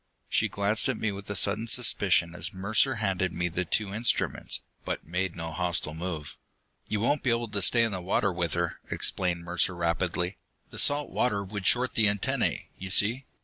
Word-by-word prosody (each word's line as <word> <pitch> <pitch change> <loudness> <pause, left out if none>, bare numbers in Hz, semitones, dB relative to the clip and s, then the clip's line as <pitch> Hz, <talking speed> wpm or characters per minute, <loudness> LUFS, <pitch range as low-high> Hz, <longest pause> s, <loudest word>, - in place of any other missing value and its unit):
She - - +1
glanced 100 +5 +3
at 130 - -1
me 110 - -1
with 100 0 -4
sudden 105 +4 +2
suspicion 100 -7 +3
as 90 +3 0
Mercer 110 +7 +1
handed 95 -4 -1
me 90 0 -1
the 90 +2 -2
two 100 +3 -1
instruments, 115 +3 0 0.2
but - - -4
made 90 +2 -2
no 80 -1 -5
hostile 85 -2 -1
move. 80 -2 -6 0.5
"You 105 - -1
won't 145 +7 +1
be 130 - 0
able 115 -1 0
to 100 -1 0
stay 115 +5 +5
in 115 - 0
the 95 -2 -4
water 95 +1 0
with 85 -2 -2
her," - - -2
explained 90 -2 0
Mercer 90 +1 0
rapidly. 85 +2 -1 0.3
"The - - -6
salt 145 +1 +3
water 100 -5 0
would 100 0 -4
short 125 +1 +2
the 110 -2 +4
antennae, 100 -1 -1
you 95 - -6
see. 110 +7 +3
100 Hz, 190 wpm, -27 LUFS, 90-110 Hz, 0.5 s, stay